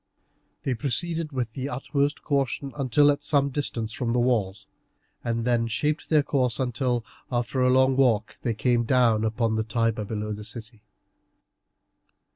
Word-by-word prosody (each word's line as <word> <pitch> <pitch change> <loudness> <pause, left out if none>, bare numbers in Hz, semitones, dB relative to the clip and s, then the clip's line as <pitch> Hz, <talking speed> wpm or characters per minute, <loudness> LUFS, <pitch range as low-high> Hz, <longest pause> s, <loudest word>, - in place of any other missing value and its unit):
They 135 - 0
proceeded 155 +5 -1
with 125 -4 -3
the 135 +2 -4
utmost 140 +2 -1
caution 140 -1 -1
until 145 +1 +4
at 145 - -3
some 140 -1 +2
distance 115 -6 -2
from 115 -1 -2
the 125 - +2
walls; 105 -6 0 0.6
and 115 -1 -2
then 120 -2 +1
shaped 150 +7 -1
their 150 -2 +4
course 130 -4 0
until, 125 -2 -1 0.3
after 125 +2 -1
a 125 - +4
long 130 +1 +4
walk, 115 -5 +2
they 115 -2 -1
came 120 +2 +2
down 115 -3 +3
upon 110 0 0
the 110 - +1
Tiber 115 -1 0
below 105 0 -4
the 105 +1 -7
city. 110 +1 -7
125 Hz, 155 wpm, -25 LUFS, 115-135 Hz, 0.6 s, until